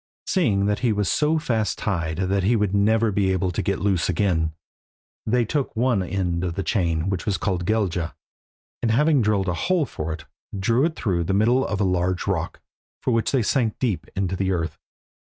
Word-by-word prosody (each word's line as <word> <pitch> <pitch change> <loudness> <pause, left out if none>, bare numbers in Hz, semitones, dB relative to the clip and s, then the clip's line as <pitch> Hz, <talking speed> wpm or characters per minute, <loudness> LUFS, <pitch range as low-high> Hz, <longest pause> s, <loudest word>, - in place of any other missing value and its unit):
Seeing 105 - +2
that 105 0 0
he 120 -3 +1
was 105 -2 0
so 155 +2 +2
fast 115 -8 -1
tied 80 -6 -2
that 95 +1 +1
he 105 +6 +2
would 105 -3 0
never 110 +2 +3
be 95 -1 +1
able 95 0 0
to 85 - -2
get 100 - -1
loose 95 -4 0
again, 85 -5 +1 0.8
they 120 +1 +2
took 140 +3 -2
one 120 -3 +2
end 90 -2 -1
of 85 -2 -2
the 100 - -2
chain, 85 -5 0
which 95 0 -2
was 100 - +1
called 90 -4 -2
Gelgja, 95 -6 0 0.7
and 115 - +1
having 145 +4 +3
drilled 105 -3 +1
a 90 - +1
hole 170 - +1
for 80 - -5
it, 80 -2 -6 0.3
drew 115 +8 +2
it 160 -1 -1
through 90 - -1
the 95 +3 0
middle 120 +6 +3
of 100 -4 -2
a - - +2
large 90 -1 0
broad - - +1 0.2
rock, - - -28 0.4
which 115 -3 +1
they 130 -4 +2
sank 115 -1 +1
very 125 -4 +2
deep 80 -4 -6
in 95 0 0
the 95 +1 -1
earth. 85 -3 -2
100 Hz, 205 wpm, -23 LUFS, 90-115 Hz, 0.8 s, never